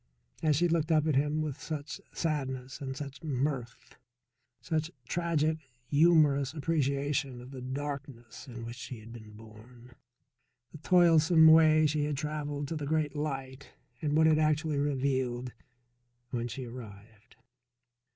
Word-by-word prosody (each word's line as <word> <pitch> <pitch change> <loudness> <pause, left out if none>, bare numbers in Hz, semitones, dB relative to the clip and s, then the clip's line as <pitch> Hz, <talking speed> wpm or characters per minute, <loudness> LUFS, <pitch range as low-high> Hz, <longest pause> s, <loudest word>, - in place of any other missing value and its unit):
And 155 -2 +3
she 175 +5 +3
looked 165 -1 0
up 155 -1 +3
at 155 -3 +1
him 150 +3 +1
with 145 -3 -5
such 150 -2 -5
sadness 135 -5 -3
and 135 -1 -5
such 140 -2 -7
mirth 135 -5 -3 0.6
such 160 -2 -2 0.2
tragic, 160 -2 0 0.3
humorous 145 -3 +4
appreciation 140 -3 -1
of 125 +2 -11
the 130 -2 -8
darkness 135 -2 -6
in 120 -2 -8
which 120 +1 -7
she 120 0 -7
had 115 +2 -12
been 110 -2 -11
born, 115 +3 -15 0.8
the 155 - -11
toilsome 165 -1 +5
way 155 -1 +7
she 150 0 +1
had 150 -2 -2
travelled 145 -1 -3
to 165 - -3
the 150 -2 -4
Great 155 -1 0
Light 135 -2 -5 0.3
and 150 -1 +1
what 160 - +5
it 155 -1 +4
actually 155 -1 +1
revealed 130 -3 -1 0.8
when 120 -1 -2
she 125 +2 -6
arrived. 110 -3 -12
145 Hz, 140 wpm, -30 LUFS, 125-155 Hz, 0.8 s, way